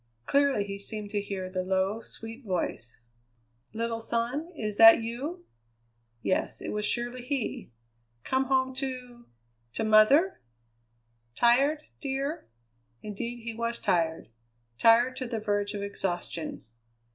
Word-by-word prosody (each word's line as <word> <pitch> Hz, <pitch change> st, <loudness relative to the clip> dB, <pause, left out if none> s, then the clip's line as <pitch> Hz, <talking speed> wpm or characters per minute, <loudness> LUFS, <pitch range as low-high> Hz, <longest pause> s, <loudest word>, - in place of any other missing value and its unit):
Clearly 280 Hz, -6 st, +3 dB
he 200 Hz, 0 st, -6 dB
seemed 205 Hz, 0 st, -6 dB
to 205 Hz, -2 st, 0 dB
hear 195 Hz, -2 st, -4 dB
the 185 Hz, 0 st, -2 dB
low, 190 Hz, +3 st, 0 dB
sweet 225 Hz, +4 st, -9 dB
voice: 175 Hz, -, -3 dB, 0.7 s
"Little 230 Hz, +1 st, -2 dB
son, 235 Hz, +8 st, -2 dB
is 210 Hz, -6 st, -3 dB
that 225 Hz, 0 st, +10 dB
you?" 275 Hz, +11 st, -5 dB, 0.8 s
Yes, 185 Hz, -, 0 dB
it -, -, -5 dB
was 210 Hz, 0 st, -1 dB
surely 240 Hz, +2 st, -2 dB
he! 255 Hz, -1 st, -3 dB, 0.5 s
"Come 265 Hz, 0 st, +1 dB
home 260 Hz, 0 st, +1 dB
to 250 Hz, -3 st, -5 dB, 0.5 s
to -, -, -2 dB
mother? 220 Hz, -, +5 dB, 0.9 s
Tired, 275 Hz, +6 st, +3 dB, 0.2 s
dear?" 275 Hz, -, -3 dB, 0.5 s
Indeed 235 Hz, +3 st, -5 dB
he 230 Hz, 0 st, -4 dB
was 235 Hz, +1 st, -2 dB
tired 165 Hz, -7 st, 0 dB, 0.5 s
tired 240 Hz, +3 st, +5 dB
to 255 Hz, -, -3 dB
the 235 Hz, -1 st, -3 dB
verge 205 Hz, -1 st, -1 dB
of 200 Hz, -, -3 dB
exhaustion. 175 Hz, -5 st, -4 dB
230 Hz, 125 wpm, -28 LUFS, 205-260 Hz, 0.9 s, that